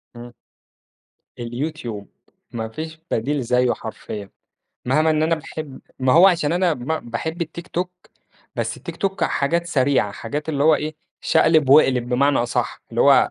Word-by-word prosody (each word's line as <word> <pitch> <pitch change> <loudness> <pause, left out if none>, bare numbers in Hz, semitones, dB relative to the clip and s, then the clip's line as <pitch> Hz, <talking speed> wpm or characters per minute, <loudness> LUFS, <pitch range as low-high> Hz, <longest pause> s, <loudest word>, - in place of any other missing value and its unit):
امم. 120 0 -10 1.1
الyoutube 120 -3 -5 0.5
ما 110 -1 -4
فيش 160 +5 -7
بديل 140 +5 0
زيّه 125 +1 +2
حرفيًا 105 -2 -7 0.6
مهما 155 +5 +3
إن 155 0 +2
أنا 165 +1 +2
باحب 155 -2 -8 0.2
ما 130 0 +3
هو 180 +4 +8
عشان 165 -5 +2
أنا 175 -2 +2
ما 145 +5 -3
باحب 160 +9 -4
الtiktok، 180 +2 -6 0.5
بس - - -3
الtiktok 195 0 -3
حاجات 170 +5 0
سريعة 130 -8 +2
حاجات 145 +9 -5
اللي 145 -2 0
هو 155 -1 +6
إيه 155 +1 -4 0.3
شقلب 155 -4 +3
واقلب 130 -4 +5
بمعنى 140 +3 +3
أصح 120 0 -2
اللي - - +1
هو - - +6
145 Hz, 145 wpm, -22 LUFS, 120-160 Hz, 1.1 s, هو